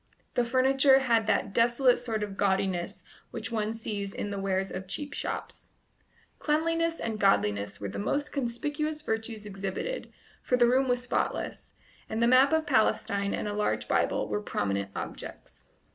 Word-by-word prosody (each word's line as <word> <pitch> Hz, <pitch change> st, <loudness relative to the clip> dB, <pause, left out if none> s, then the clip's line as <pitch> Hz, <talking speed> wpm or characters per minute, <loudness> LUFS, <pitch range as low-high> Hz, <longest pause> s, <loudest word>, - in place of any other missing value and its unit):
The 245 Hz, -, +2 dB
furniture 265 Hz, +2 st, +4 dB
had 230 Hz, -4 st, +2 dB
that 200 Hz, -, +1 dB
desolate 240 Hz, +2 st, +4 dB
sort 225 Hz, -3 st, -2 dB
of 200 Hz, -2 st, -5 dB
gaudiness 190 Hz, -3 st, 0 dB, 0.3 s
which 245 Hz, -, -5 dB
one 220 Hz, -1 st, -1 dB
sees 205 Hz, -3 st, -4 dB
in 205 Hz, -, -3 dB
the 200 Hz, -, -3 dB
wares 195 Hz, 0 st, -1 dB
of 185 Hz, +1 st, -6 dB
cheap 290 Hz, +9 st, -4 dB
shops. -, -, -5 dB, 0.7 s
Cleanliness 330 Hz, +2 st, +1 dB
and 220 Hz, -2 st, -3 dB
godliness 105 Hz, -, +2 dB
were 100 Hz, -, -4 dB
the 95 Hz, -, -5 dB
most 285 Hz, +8 st, -1 dB
conspicuous 295 Hz, +4 st, -2 dB
virtues 220 Hz, -1 st, -3 dB
exhibited, 195 Hz, -, -4 dB, 0.3 s
for 250 Hz, -, +1 dB
the 240 Hz, -, +5 dB
room 260 Hz, +2 st, +3 dB
was 245 Hz, 0 st, +1 dB
spotless, 250 Hz, -, -2 dB, 0.4 s
and 220 Hz, -, -2 dB
the 235 Hz, -, +4 dB
map 255 Hz, +4 st, +6 dB
of 320 Hz, 0 st, +2 dB
Palestine 200 Hz, -6 st, +1 dB
and -, -, -3 dB
a 205 Hz, -, -2 dB
large 210 Hz, 0 st, -1 dB
Bible -, -, +1 dB
were 210 Hz, -, -2 dB
prominent 100 Hz, -, -2 dB
objects. -, -, -8 dB
225 Hz, 160 wpm, -29 LUFS, 200-265 Hz, 0.7 s, map